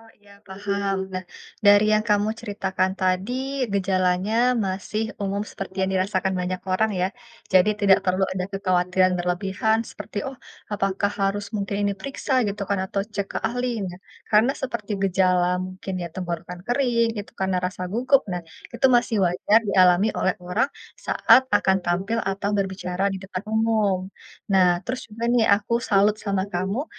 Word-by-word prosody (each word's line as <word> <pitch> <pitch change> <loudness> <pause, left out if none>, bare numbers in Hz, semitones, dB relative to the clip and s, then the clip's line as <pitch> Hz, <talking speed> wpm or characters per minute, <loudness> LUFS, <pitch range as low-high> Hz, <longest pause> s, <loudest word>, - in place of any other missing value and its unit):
Oh 225 0 -19
iya 205 -1 -19
paham. 200 0 -2 0.2
Nah, 185 0 -3 0.4
dari 205 +1 +7
yang 215 0 +3
kamu 210 0 +3
ceritakan 190 -3 -1
tadi, 185 +4 0 0.4
gejalanya 195 +5 +2
masih 195 +3 -3 0.2
umum 200 +1 -1
seperti 195 0 -6
yang 190 0 +1
dirasakan 190 0 0
banyak 180 0 -3
orang 220 +3 +2
ya, 185 - +2 0.4
jadi 185 +3 +5
tidak 195 -2 +6
perlu 185 0 +1
ada 185 -1 -2
kekhawatiran 185 -1 +2
berlebihan 190 +5 0
seperti, 205 - -6
"Oh, 265 - -9 0.3
apakah 200 -1 0
harus 200 +1 0
mungkin 200 0 -2
ini 200 - 0
periksa 275 +5 -5
gitu 205 -1 -3
kan 200 -1 +1
atau 195 +1 -2
cek 200 - -1
ke - - -1
ahli?" 240 -4 -2
Nah, 180 - -8 0.3
karena 225 +5 +4
seperti 235 -5 -4
gejala 180 -2 +2
mungkin 185 +1 -7
ya 175 -1 -4
tenggorokan 175 -1 -5
kering, 235 -3 +1
itu 205 - -6
karena 190 -1 +1
rasa 180 0 -3
gugup. 255 +4 +3
Nah, 175 -1 -4 0.3
itu 265 - +3
masih 240 -2 +1
wajar 180 +5 +3
dialami 190 0 +4
oleh 190 - 0
orang 180 +10 +1 0.4
saat 260 0 +5
akan 190 0 +3
tampil 190 +6 -1
atau 200 0 -2
berbicara 190 -1 -1
di 195 - -3
depan 190 0 -5
umum. 220 -3 +2 0.5
Nah, 180 -2 +5
terus 255 -1 -5
juga 225 +2 -6
nih 235 -2 +3
aku 235 +3 -1
salut 210 0 +2
sama 195 -2 -1
kamu, 195 - -1
195 Hz, 160 wpm, -24 LUFS, 185-215 Hz, 0.5 s, dari